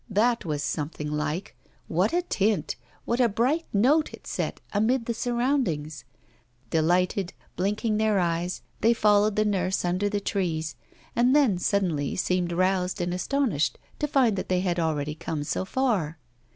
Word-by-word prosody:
That 225 +2 +2
was 150 -2 -2
something 150 0 -3
like 150 +4 -3 0.3
what - - +1
a 350 +1 +1
tint, 205 - 0 0.3
what 235 - 0
a 245 -2 +4
bright 255 +10 +1
note 275 +10 +3
it - - -23
set - - -3
amid 230 +4 +2
the 235 - -1
surroundings! 235 - -1 0.7
Delighted, 180 +3 +1 0.2
blinking 210 +3 0
their 215 -1 +2
eyes, 175 0 -1 0.2
they 230 +1 +4
followed 210 -1 +4
the 215 - +2
nurse 190 -3 0
under 185 +4 +1
the 205 0 -1
trees, 165 - -2 0.4
and 245 +3 +4
then 250 -12 +4
suddenly 175 -8 0
seemed 180 -1 0
roused 185 +2 +1
and 175 0 -1
astonished 205 - 0 0.2
to 295 - 0
find 255 -8 +3
they 185 -1 0
had 180 -2 0
already 150 -2 -1
come 155 -1 -4
so 165 - -2
far. 195 - 0
195 Hz, 150 wpm, -26 LUFS, 170-230 Hz, 0.7 s, a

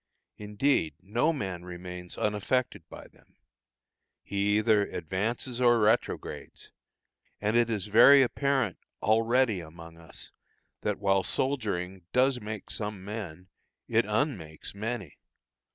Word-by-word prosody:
Indeed, 105 - 0
no 120 - +1
man 95 - -4
remains 90 0 -8
unaffected 105 +5 -1
by - - -11
them; - - -27 0.9
he 100 +1 +1
either 110 -1 +4
advances 115 +8 -3
or 120 -1 +5
retrogrades, 110 +2 -1 0.7
and 105 +2 0
it 120 0 +4
is 105 -4 -2
very 120 +6 +8
apparent 135 -5 0 0.2
already 115 0 +3
among 85 0 -11
us 80 - -8 0.5
that 105 - -1
while 95 -1 +2
soldiering 95 -8 -2
does 130 0 +3
make 105 0 -6
some 105 -3 -5
men, 95 -4 -7 0.4
it 115 -2 +2
un 135 +7 +1
makes 80 -4 -10
many. 105 -4 -5
105 Hz, 120 wpm, -29 LUFS, 95-120 Hz, 0.9 s, very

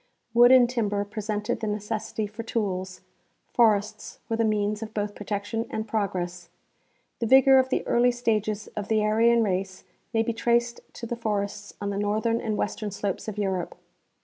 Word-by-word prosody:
Wood 240 +1 +7
and 255 -2 +7
timber 205 -5 -1
pre 210 +2 -6
sented 210 0 -2
the 220 - -3
necessity 210 +1 -3
for 215 +3 -7
tools; 190 -5 -3 0.5
forests 215 -2 +1
were 225 - -1
the 230 - +1
means 210 -1 0
of 220 -1 -7
both 205 -1 -2
protection 205 +3 -3
and 220 0 -4
progress. 180 -5 -3 0.7
The 230 - -1
vigor 265 +2 +7
of 260 0 +1
the - - -1
early 245 +1 +3
stages 215 -3 -1
of 205 -1 -4
the 220 - +2
Ar3^an 225 +2 +3
race 190 -1 -2 0.3
may 225 -1 +2
be 230 - -1
traced 235 +1 +1
to 235 - -7
the 240 - -3
forests 205 -2 -3
on 200 0 -3
the 200 - -2
northern 220 +3 0
and 215 -2 -2
western 210 +1 -2
slopes 200 0 -4
of 215 -1 -5
Europe. 190 -4 -2
215 Hz, 175 wpm, -26 LUFS, 205-230 Hz, 0.7 s, Wood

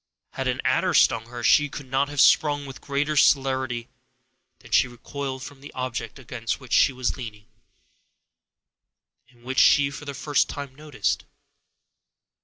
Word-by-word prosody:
Had - - -4
an - - -1
adder - - +2
stung 115 0 +4
her, 120 0 -8
she 150 +4 +4
could 145 - -8
not 135 +2 0
have 145 -1 -5
sprung 145 0 +4
with 135 -4 -10
greater 145 +2 -1
celerity 130 -4 +2 0.7
than - - -18
she - - +4
recoiled 130 +2 -6
from 135 +1 -11
the 145 - -11
object 130 +1 -4
against 125 -2 -4
which 130 -4 -8
she - - +5
was 130 -1 -2
leaning, 110 -5 -8 1.8
and 120 -1 -24
which 130 +1 -1
she 140 +2 +5
for 145 +1 -9
the 140 -1 -6
first 145 +1 +1
time 140 -2 -6
noticed. 150 +1 -2
135 Hz, 155 wpm, -24 LUFS, 125-145 Hz, 1.8 s, she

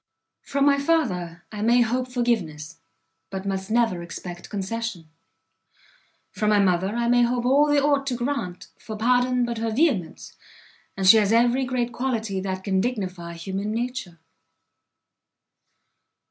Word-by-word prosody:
From 280 0 0
my 280 -1 +4
father 185 - 0
I 210 -1 -6
may 240 +3 +4
hope 250 +2 0
forgiveness, 175 - -2 0.5
but 190 0 -6
must 190 0 -3
never 225 -6 +1
expect 175 +1 -8
concession; 205 -3 -4 1.2
from 210 -1 -1
my 210 - +4
mother 190 +1 +2
I 235 0 0
may 245 0 +4
hope 240 0 +1
all 285 +3 +4
she 290 - +4
ought 280 -1 +1
to 255 - 0
grant, 240 -8 -4
for 220 -1 -7
pardon 245 +2 +2
but 235 -1 -4
her 225 0 -1
vehemence, 225 - -1 0.6
and 190 - -1
she 225 - +9
has 210 -1 +2
every 240 +3 +3
great 245 -1 -2
quality 230 -6 -2
that 190 0 -4
can 190 -2 +1
dignify 185 -7 -3
human 195 +5 -4
nature!" 240 -7 -4
225 Hz, 145 wpm, -24 LUFS, 190-245 Hz, 1.2 s, she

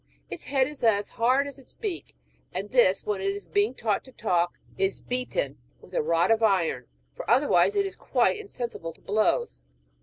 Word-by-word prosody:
Its - - -6
head 270 -1 +2
is 295 -2 -9
as 205 -3 +3
hard 255 +4 +2
as 285 -1 -8
its 265 - -16
beak; 405 -7 -5 0.4
and 195 +3 -4
this, 220 -7 +4
when 205 -2 -1
it 195 - -1
is 200 +1 -4
being 210 +5 +1
taught 215 -5 0
to 260 - -14
talk, 175 -7 0 0.2
is 195 0 0
beaten 255 - -2 0.2
with - - -18
a - - +2
rod 170 - +2
of 225 0 +3
iron, 180 - +2 0.3
for - - -7
otherwise 295 +9 +4
it 400 -1 +2
is 390 - -5
quite - - +1
insensible 240 - -6
to - - -23
blows. 205 - 0
225 Hz, 190 wpm, -27 LUFS, 195-270 Hz, 0.4 s, this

